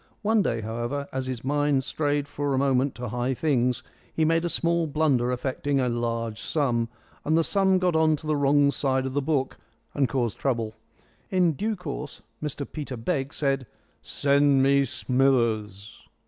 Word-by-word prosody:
One 220 +1 +3
day, 115 - -1
however, 120 +6 -3
as 130 0 -2
his 130 -2 -4
mind 145 0 +1
strayed 145 0 -1
for 145 -1 -2
a - - 0
moment 135 0 +2
to 125 -1 -5
high 125 +3 -1
things, 125 -4 +1 0.3
he 160 - +1
made 165 +1 +2
a 175 - 0
small 170 0 +1
blunder 140 -5 +1
affecting 135 +2 -1
a 125 -1 +1
large 115 -1 -2
sum, 120 -7 0 0.3
and 155 +2 +2
the 165 - +3
sum 190 +1 +3
got 180 -2 +1
on 160 -1 +4
to 155 - -11
the 155 0 +1
wrong 145 0 +4
side 130 -2 0
of 130 - -3
the 145 - +1
book 135 -2 -1 0.3
and 135 -4 +1
caused 120 -3 -1
trouble. 115 -5 -1 0.6
In 180 -3 +3
due 215 +9 -2
course 150 -5 -7 0.2
Mr 150 -1 -3
Peter 140 -4 -6
Begg 135 +4 -2
said, 135 -3 -1 0.3
"Send 140 -1 +3
me 140 0 +4
Smithers." 115 -5 0
140 Hz, 175 wpm, -26 LUFS, 125-150 Hz, 0.6 s, on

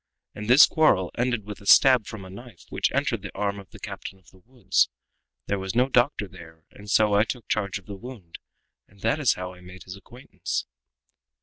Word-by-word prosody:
and 105 +2 -7
this 130 +4 +9
quarrel 95 - +2
ended 120 -3 -1
with 105 -1 -9
a 100 - -12
stab 130 -2 +6
from 105 -3 -8
a - - -11
knife, 110 -1 -13
which - - 0
entered - - -1
the - - -7
arm 100 0 -2
of 95 -3 -13
the - - -13
captain 95 - -8
of 95 - -23
the 95 - -21
woods. 125 -7 +1 0.6
There 100 - -2
was 95 +2 -5
no 125 +2 +3
doctor 120 -4 +2
there, 80 -3 -15
and 105 +1 -13
so 105 0 +3
I 100 +1 +5
took 115 0 -6
charge 100 -3 -1
of 100 - -14
the 100 -2 -8
wound, 110 -7 -11 0.5
and 100 0 -23
that 115 +8 +1
is 135 -9 +3
how 90 0 -6
I 90 - -16
made 90 +1 -12
his 95 - -9
acquaintance." 120 +7 -6
100 Hz, 215 wpm, -25 LUFS, 95-120 Hz, 0.6 s, this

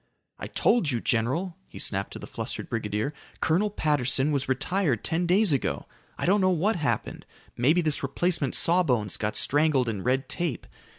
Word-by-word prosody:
"I - - -5
told 230 -11 +2
you, 120 -4 0
general," 140 +11 -1
he - - -12
snapped 100 -1 -1
to - - -6
the - - -8
flustered - - -6
brigadier, 110 +4 -2 0.3
"Colonel 185 +7 +2
Patterson 145 -6 +1
was 140 -2 -1
retired 145 - 0
ten 170 +2 0
days 190 -1 +3
ago. 135 - -1 0.3
I - - -2
don't 200 +3 +3
know 185 - +3
what 185 +5 +1
happened. 155 -5 -2 0.3
Maybe 150 +9 +3
this 155 -3 +1
replacement 140 0 0
sawbones 130 - +2
got 105 0 -2
strangled 145 -3 +2
in 105 -4 -3
red 130 +5 0
tape. 170 -8 -2
145 Hz, 170 wpm, -26 LUFS, 125-175 Hz, 0.3 s, days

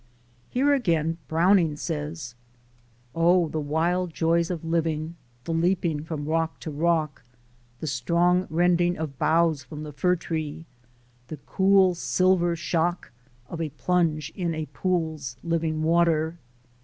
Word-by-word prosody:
Here 280 +3 +2
again 165 - 0
Browning 165 -1 +3
says: 150 -4 -5 0.8
"Oh, 170 +1 +3
the 155 - -3
wild 165 +4 -1
joys 165 0 +1
of 170 -3 -4
living! 165 -1 -1 0.3
the 165 - -3
leaping 165 -2 0
from 155 -3 -4
rock 160 +1 -1
to 155 - -5
rock, 155 -1 0 0.6
The - - -3
strong 170 +7 +1
rending 175 +1 +2
of 150 -4 -5
boughs 160 -3 +2
from 150 +4 -8
the 150 -1 -8
fir 180 +6 +2
tree, 160 -2 -5 0.6
the 155 - -7
cool 190 -1 +4
silver 175 0 +2
shock 170 +1 -1 0.4
Of 165 +4 -6
a 160 - -2
plunge 155 -1 0
in 170 -3 -2
a 155 0 -3
pool's 160 -9 -2
living 165 -2 -1
water. 165 0 +2
165 Hz, 130 wpm, -25 LUFS, 155-175 Hz, 0.8 s, cool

